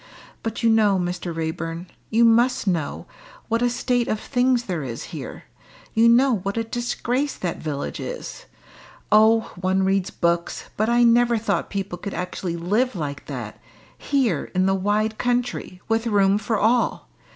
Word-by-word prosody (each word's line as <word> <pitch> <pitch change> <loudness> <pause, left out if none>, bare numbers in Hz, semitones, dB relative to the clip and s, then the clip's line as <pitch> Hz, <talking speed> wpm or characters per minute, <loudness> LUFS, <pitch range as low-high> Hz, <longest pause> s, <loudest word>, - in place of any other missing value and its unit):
"But 225 +1 -4
you 230 - +5
know, 210 -3 +4
Mr. 175 -1 -3
Raeburn 165 +1 -4 0.2
you 230 +2 +4
must 240 +2 +3
know 170 -7 -1 0.4
what 230 +1 +1
a 245 - +3
state 245 0 0
of 215 - -1
things 250 -1 +1
there 180 -7 -3
is 120 -4 -5
here - - -7 0.5
you 230 +1 +5
know 245 0 +4
what 200 +3 -4
a 225 - +1
disgrace 240 +4 -2
that 175 -2 -4
village 145 -3 -4
is. - - -7 0.6
Oh! 220 +1 +5
one 185 +1 +1
reads 195 -1 +1
books, 170 0 -1
but 215 +2 0
I 240 0 +4
never 235 0 +4
thought 220 - -1
people 195 -3 -4
could 200 +1 -5
actually 180 -1 -3
live 210 +9 0
like 145 -4 -5
that - - -6 0.4
here 245 - 0
in 185 0 +3
the 195 - +3
wide 210 +3 0
country, 245 -6 -2
with 225 +1 0
room 200 -2 +3
for 220 +1 -1
all. 230 +3 +1
215 Hz, 165 wpm, -23 LUFS, 180-235 Hz, 0.6 s, you